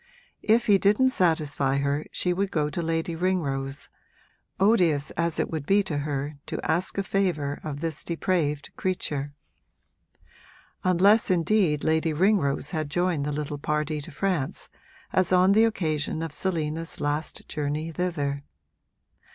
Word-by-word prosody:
If 230 +2 +3
he 200 -2 +5
didn't 210 +7 +4
satisfy 150 - +1
her 140 +2 -1
she 180 - 0
would 195 +2 -1
go 150 -3 0
to 170 - -2
Lady 165 0 -1
Ringrose, 145 -6 -2 0.7
odious 180 -8 +3
as 170 -1 0
it - - -1
would 155 -3 -4
be 200 +1 +4
to 155 -6 -2
her 145 0 -3
to - - -4
ask 175 +5 0
a 195 - +1
favour 175 -8 -1
of 145 -2 -5
this 160 -3 -3
depraved 165 -4 -1
creature: 145 -6 -2 1.5
unless 195 +5 +4
indeed 175 -3 +2
Lady 160 0 +1
Ringrose 175 -4 +1
had 155 -4 -2
joined 170 -2 0
the - - -1
little 145 0 -4
party 150 +1 -1
to 145 - -9
France, 170 -3 -2 0.4
as 185 -1 +2
on 185 +1 +5
the 220 +3 +5
occasion 160 -7 -1
of 165 - -4
Selina's 165 -3 -2
last 145 +2 -2
journey 150 +2 -3
thither. 150 -5 -2
160 Hz, 145 wpm, -26 LUFS, 145-185 Hz, 1.5 s, he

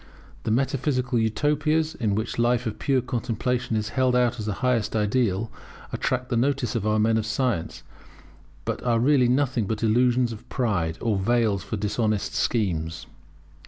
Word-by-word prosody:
The - - -1
metaphysical 130 0 0
Utopias, 150 +7 +1
in 105 -5 -1
which 110 +2 -3
a - - +4
life 120 +1 +2
of 110 -2 -4
pure 135 -3 +2
contemplation 120 0 -2
is 105 -1 -1
held 130 0 +1
out 125 -1 +2
as 105 - -4
the 105 - 0
highest 120 -4 +1
ideal, 105 -1 0 0.4
attract 125 -1 -1
the 120 - 0
notice 130 -1 0
of 110 -3 -1
our 110 0 +2
men 110 +1 +3
of 110 - -3
science; 115 -7 -1 0.8
but - - -3
are 120 -2 +1
really 130 0 +4
nothing 125 -4 +1
but 110 +1 -3
illusions 120 +2 +3
of 115 +2 -10
pride, 95 -11 -1
or 110 -3 +1
veils 110 -1 +1
for 110 - -4
dishonest 105 0 -1
schemes. 85 -8 -1
115 Hz, 165 wpm, -25 LUFS, 105-125 Hz, 0.8 s, a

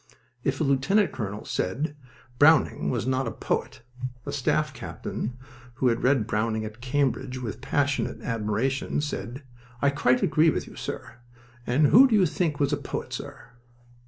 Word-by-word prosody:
If 135 -1 0
a - - +2
lieutenant 140 +9 +2
colonel 105 -4 -5
said, 145 - -2 0.4
"Browning 155 +2 +5
was 120 -3 -1
not 130 +1 0
a - - -2
poet," - - -3 0.4
a 140 - -4
staff 145 +1 0
captain, 120 0 -5 0.4
who 130 0 +2
had 115 - 0
read 130 -4 +3
Browning 110 +1 -1
at 110 +2 -9
Cambridge 130 0 0
with 120 -1 -5
passionate 140 +1 0
admiration, 115 +6 -1
said: 140 -2 -5 0.4
"I 140 +1 +3
quite 130 -3 +2
agree 160 +2 +4
with - - -1
you, - - -13
sir. - - -6 0.5
And 135 +5 +3
who 265 +5 +8
do 230 - +2
you 195 -3 +5
think 160 -3 -1
was 140 0 +2
a - - +2
poet, 140 - -5
sir?" - - -7
135 Hz, 160 wpm, -26 LUFS, 120-145 Hz, 0.5 s, who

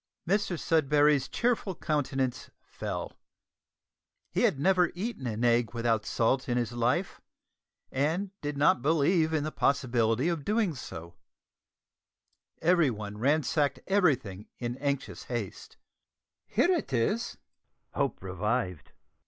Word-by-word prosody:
Mr 195 -2 +1
Sudberry's 150 -3 +3
cheerful 235 -6 0
countenance 135 -5 -1
fell. - - -6 1.1
He - - 0
had 135 - +2
never 180 +2 +3
eaten 190 - -4
an 110 +1 -3
egg 120 0 +2
without 115 -2 0
salt 130 +3 +1
in 120 - +1
his 120 -2 -1
life, 125 +10 -1 0.7
and 160 +9 0
did 145 -1 -3
not 140 -3 +4
believe 160 +3 +3
in 155 -2 0
the 155 - -3
possibility 125 -2 +1
of 170 -4 -1
doing 210 -2 +1
so. 85 - -8 1.5
Everyone 125 - +1
ransacked 145 +2 +1
everything 135 - +1
in 120 0 -3
anxious 140 -1 -3
haste. - - -5 0.7
"Here 355 - +2
it 335 - -1
is!" 165 - 0
140 Hz, 110 wpm, -29 LUFS, 120-170 Hz, 1.5 s, not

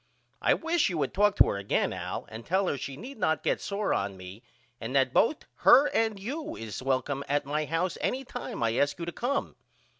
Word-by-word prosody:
I - - +4
wish 330 0 +1
you 175 - -3
would 140 -3 -1
talk 205 +1 +3
to - - +6
her - - -1
again 100 0 0
Al - - -5
and 110 +1 -7
tell 190 +6 +1
her - - 0
she 135 0 -6
need 255 - -9
not 160 -5 +1
get - - 0
sore 200 0 -1
on 100 -1 -2
me 95 +4 -10 0.4
and 120 +4 -5
that 130 -2 +3
both 290 +6 +2
her 275 +4 +7
and 220 -3 0
you 290 +10 -5
is 110 0 -6
welcome 135 +1 -1
at 145 0 +1
my 150 +2 -1
house 165 +3 -1
any 265 +1 -1
time 120 - -5
I 115 0 +1
ask 145 0 +1
you 170 - -4
to 170 - -4
come. 260 +9 -2
160 Hz, 220 wpm, -28 LUFS, 130-220 Hz, 0.4 s, her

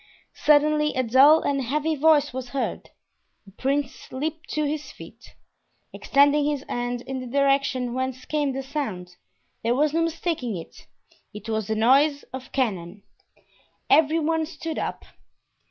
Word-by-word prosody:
Suddenly 300 0 +3
a 255 - +1
dull 270 +7 +6
and 275 -1 0
heavy 300 +5 -1
noise 295 -2 +3
was 255 -1 -5
heard. 270 +1 -4 0.6
The 195 - -16
prince 270 +5 -3
leaped 310 +4 -4
to 305 - -1
his 300 +1 -4
feet, - - -14 0.6
extending 285 +1 +3
his 290 -2 -2
hand 245 0 -3
in 265 +1 -5
the 255 - -7
direction 275 -2 +1
whence 260 0 -3
came 295 -2 -1
the 270 +1 -4
sound, 210 -11 -5 0.4
there 235 +2 +1
was 295 +2 +1
no 330 - +1
mistaking 330 - -2
it—it 210 +5 -14
was 220 -2 -2
the 220 - -1
noise 280 +6 +3
of 260 0 -8
cannon. 200 -7 -2 0.9
Every 315 +1 +5
one 320 0 0
stood 325 -1 -5
up. - - -4
275 Hz, 145 wpm, -24 LUFS, 245-300 Hz, 0.9 s, dull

